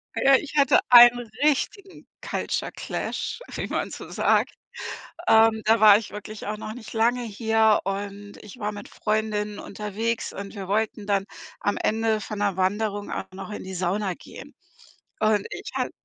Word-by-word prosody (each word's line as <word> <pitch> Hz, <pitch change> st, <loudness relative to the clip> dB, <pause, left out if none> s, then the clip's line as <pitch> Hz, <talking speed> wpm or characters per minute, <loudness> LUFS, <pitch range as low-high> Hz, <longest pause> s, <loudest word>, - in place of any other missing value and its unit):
Ja, 270 Hz, 0 st, +5 dB
ich 295 Hz, +2 st, -2 dB
hatte 280 Hz, -, +5 dB
einen 240 Hz, -1 st, +8 dB
richtigen 380 Hz, +7 st, -1 dB, 0.2 s
Culture -, -, -2 dB
Clash, -, -, -4 dB, 0.2 s
wie -, -, -3 dB
man -, -, -2 dB
so -, -, -8 dB
sagt. -, -, +2 dB, 0.8 s
Ähm, 220 Hz, 0 st, +5 dB
da 225 Hz, 0 st, +4 dB
war 210 Hz, -2 st, +9 dB
ich 225 Hz, -, -8 dB
wirklich 210 Hz, 0 st, -8 dB
auch 210 Hz, +1 st, -3 dB
noch 215 Hz, +1 st, -6 dB
nicht 235 Hz, -3 st, -10 dB
lange 235 Hz, +2 st, +2 dB
hier 220 Hz, -1 st, +2 dB
und 200 Hz, +1 st, -5 dB
ich 210 Hz, +3 st, -12 dB
war 210 Hz, -2 st, -2 dB
mit 205 Hz, 0 st, -9 dB
Freundinnen 210 Hz, -1 st, -2 dB
unterwegs 215 Hz, +3 st, -3 dB
und 200 Hz, +2 st, -7 dB
wir 195 Hz, -2 st, -7 dB
wollten 210 Hz, 0 st, -1 dB
dann 200 Hz, -1 st, +1 dB, 0.4 s
am 205 Hz, -, 0 dB
Ende 220 Hz, 0 st, 0 dB
von 210 Hz, 0 st, -6 dB
'ner 200 Hz, -2 st, 0 dB
Wanderung 205 Hz, +2 st, -1 dB
auch -, -, -5 dB
noch 195 Hz, +2 st, -8 dB
in 210 Hz, -, -6 dB
die 190 Hz, 0 st, -7 dB
Sauna 185 Hz, +2 st, -1 dB
gehen. -, -, -12 dB, 0.7 s
Und 215 Hz, -2 st, +2 dB
ich -, -, -7 dB
hat -, -, -1 dB
215 Hz, 170 wpm, -25 LUFS, 205-225 Hz, 0.8 s, war